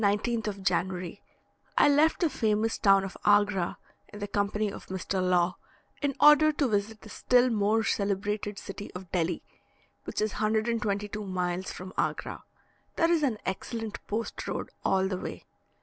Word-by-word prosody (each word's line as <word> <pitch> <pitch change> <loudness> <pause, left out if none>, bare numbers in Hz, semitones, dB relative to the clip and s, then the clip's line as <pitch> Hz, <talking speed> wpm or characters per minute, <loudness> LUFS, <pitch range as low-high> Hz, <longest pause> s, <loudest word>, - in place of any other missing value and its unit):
On 200 - +5
the 205 - +2
19th 230 0 -2
of 200 -2 -4
January 185 0 -1 0.6
I - - +6
left 295 +4 +4
the 335 - +3
famous 220 -2 0
town 195 -1 +5
of 195 - -6
Agra, 205 -3 +3 0.3
in 210 - -9
the 205 0 -4
company 205 +1 0
of - - -10
Mr. 190 0 -2
Law, 180 -1 +2 0.4
in 285 -2 0
order 300 +1 +7
to 290 -2 +1
visit 210 0 -1
the 215 - -12
still 250 +3 +3
more 215 +1 +2
celebrated 205 0 -1
city 200 +1 -7
of 180 -1 -8
Delhi, 175 -1 0 0.6
which - - -4
is 215 0 +1
122 215 -1 -1
miles 185 -1 -2
from 185 +1 -8
Agra. - - -2 0.5
There 330 +1 +3
is 335 -2 +3
an 260 -7 +1
excellent 220 +3 -4
post 220 +2 -3
road - - -4
all 190 0 +2
the 185 -1 -3
way. - - -7
205 Hz, 165 wpm, -28 LUFS, 190-225 Hz, 0.6 s, order